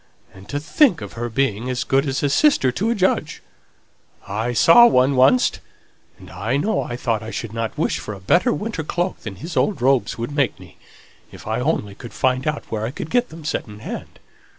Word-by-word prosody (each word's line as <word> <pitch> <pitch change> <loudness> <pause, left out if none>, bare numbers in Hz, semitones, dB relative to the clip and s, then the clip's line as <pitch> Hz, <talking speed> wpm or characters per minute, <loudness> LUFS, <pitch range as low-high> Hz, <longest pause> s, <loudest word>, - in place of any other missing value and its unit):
And 95 +1 -15
to 145 - -2
think 175 - +3
of - - -8
her 120 +1 -4
being 125 -1 -1
as 125 -1 -1
good 135 +2 +1
as 135 +1 -2
a 145 - +2
sister 210 - +3
to 205 - -1
a 235 - +1
judge! 180 -6 0 0.8
I 110 +5 -2
saw 165 - +7
one 130 - +3
oncst; 130 -1 +3 0.6
and - - -14
I 120 +6 -2
know 210 +8 0
I 120 - -5
thought 115 -3 -1
as 110 - -8
I - - -5
shouldn't 115 +1 -4
wish - - 0
for 105 - -6
a - - -11
better 180 - +2
winter 210 -7 -3
cloak 175 +4 -2
than 110 -3 -7
his 160 - -8
old 200 -9 +1
robes 125 -3 +1
would 115 +4 -4
make 140 -9 0
me, 90 -4 -15 0.5
if - - -13
I 110 +2 -2
could 125 - -2
only 105 -10 -1
find 130 +4 -2
out 150 -1 -2
where 110 -1 -2
I 110 - -1
could 150 +4 -7
get 245 0 +1
'em 160 -1 -11
second 105 -7 -4
hand. - - -7
130 Hz, 215 wpm, -21 LUFS, 115-160 Hz, 0.8 s, saw